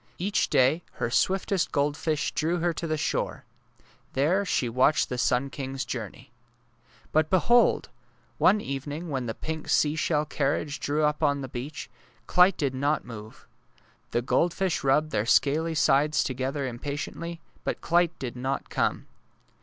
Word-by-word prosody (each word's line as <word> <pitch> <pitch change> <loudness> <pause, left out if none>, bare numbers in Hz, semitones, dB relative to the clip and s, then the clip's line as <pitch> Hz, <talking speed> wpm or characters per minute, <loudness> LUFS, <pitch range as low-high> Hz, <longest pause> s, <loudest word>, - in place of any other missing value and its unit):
Each 200 +3 0
day 135 +6 +3
her 120 - -3
swiftest 190 +5 +1
goldfish 150 +2 0
drew 165 +3 0
her 170 0 0
to 165 - -4
the 155 0 -1
shore. - - -2 0.7
There 165 +9 +2
she 130 - 0
watched 130 +6 +2
the 125 - -3
sim 125 +3 +1
king's 135 -1 -4
journey. 120 +2 -7 0.8
But 155 0 +2
behold! 235 +6 +3 0.5
one 210 - +5
evening 145 +4 -5
when 130 -3 -2
the 110 - -3
pink 160 -1 -5
sea 150 0 +3
shell 155 -1 +1
carriage 145 0 -1
drew 150 +2 0
up 150 +1 +1
on 145 -2 +2
the 135 - -5
beach, 135 +5 -6 0.4
Clyte 180 +2 +5
did 140 -3 -1
not 145 +3 0
move. 110 -2 -10 0.6
The 120 - -1
goldfish 175 +6 +1
rubbed 150 +3 +2
their 105 -3 0
scaly 155 +6 +2
sides 150 +1 +3
together 135 +2 -2
impatiently, 145 +6 -5 0.2
but - - -3
Clyte 175 0 +2
did 125 -2 -5
not 130 +2 -3
come. - - 0
145 Hz, 150 wpm, -27 LUFS, 135-165 Hz, 0.8 s, one